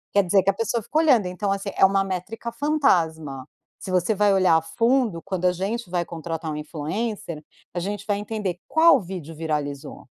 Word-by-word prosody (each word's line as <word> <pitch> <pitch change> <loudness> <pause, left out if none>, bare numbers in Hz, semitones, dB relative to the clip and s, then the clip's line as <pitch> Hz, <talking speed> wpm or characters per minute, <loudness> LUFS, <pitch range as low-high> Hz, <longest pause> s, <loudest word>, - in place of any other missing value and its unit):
Quer 200 - +5
dizer 190 +2 +4
que 195 - +2
a - - +4
pessoa 230 +2 -1
fica 300 - -3
olhando. 265 - +4
Então, 190 +3 -2
assim, 200 0 -2
é - - +6
uma 195 0 +3
métrica 195 +5 -5
fantasma. 165 - 0 0.3
Se 190 - -7
você 180 +3 +2
vai 205 0 +3
olhar 185 -3 +4
a - - 0
fundo, 225 +2 +1
quando 185 +1 -3
a 180 - +5
gente 200 +4 -3
vai 175 -1 0
contratar 165 -1 -5
um - - -4
influencer, 160 +2 -4 0.3
a 175 - -2
gente 200 +3 -4
vai 205 -1 +1
entender: 205 -4 -3
qual 330 +1 +6
vídeo 175 -4 -7
viralizou? 150 -3 -4
190 Hz, 195 wpm, -24 LUFS, 165-210 Hz, 0.3 s, é